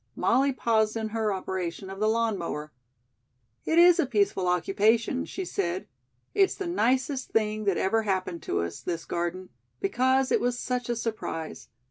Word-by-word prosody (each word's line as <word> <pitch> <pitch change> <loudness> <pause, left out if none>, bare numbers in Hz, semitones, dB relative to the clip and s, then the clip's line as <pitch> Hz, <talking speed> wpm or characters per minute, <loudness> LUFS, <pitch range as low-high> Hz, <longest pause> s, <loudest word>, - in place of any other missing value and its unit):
Molly 275 +2 +3
paused 225 -4 +1
in 220 -1 -2
her 220 -1 0
operation 190 -1 -4
of 195 - -8
the 215 +1 +2
lawn 225 -1 +1
mower. 150 -4 -5 0.9
"It 320 - +1
is 345 0 +7
a - - +2
peaceful 200 -6 +1
occupation," 215 +8 +2
she 380 - -5
said. 185 - -2 0.5
"It's 390 -1 +3
the 390 - -5
nicest 265 -4 0
thing 215 -1 0
that 195 -3 +2
ever 225 +4 +2
happened 185 -4 -2
to 85 - 0
us, 85 0 -5
this 170 -2 -4
garden, 175 +2 -3 0.3
because 260 +5 +2
it - - +3
was 245 0 0
such 250 -1 -3
a 240 - +1
surprise. 215 - -5
215 Hz, 165 wpm, -27 LUFS, 185-250 Hz, 0.9 s, is